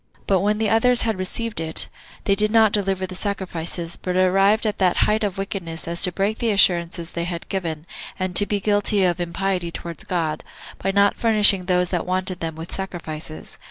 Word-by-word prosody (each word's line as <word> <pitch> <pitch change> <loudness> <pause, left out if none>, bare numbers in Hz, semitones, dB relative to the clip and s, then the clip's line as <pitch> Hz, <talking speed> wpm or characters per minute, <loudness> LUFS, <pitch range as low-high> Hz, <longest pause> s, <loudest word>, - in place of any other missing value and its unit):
But 195 -2 +2
when 210 +2 +1
the 220 0 0
others 240 +2 +4
had 220 -4 -1
received 215 +3 -1
it, 160 0 0 0.4
they 200 - +2
did 210 +2 +2
not 220 -1 +4
deliver 195 -2 0
the 185 - -8
sacrifices, 175 -3 -3
but 180 -1 -3
arrived 195 +4 +3
at 210 - -2
that 185 -2 +2
height 215 +1 0
of 200 -2 -2
wickedness 185 -5 -5
as 170 0 -1
to 180 - +2
break 200 +4 -1
the 235 - 0
assurances 175 -4 +2
they 170 0 -3
had 170 -1 -6
given, 165 -5 -4 0.3
and 185 -1 -3
to 205 - +7
be 205 - -1
guilty 205 0 +2
of 175 -1 +1
impiety 180 0 -2
towards 170 -1 -8
God, 160 -4 -2 0.4
by 195 - -2
not 200 +1 +3
furnishing 210 -5 +5
those 180 -1 +1
that 180 -2 -2
wanted 185 0 -2
them 165 -2 -4
with 165 +1 -9
sacrifices. 160 -5 -7
185 Hz, 195 wpm, -22 LUFS, 170-205 Hz, 0.4 s, to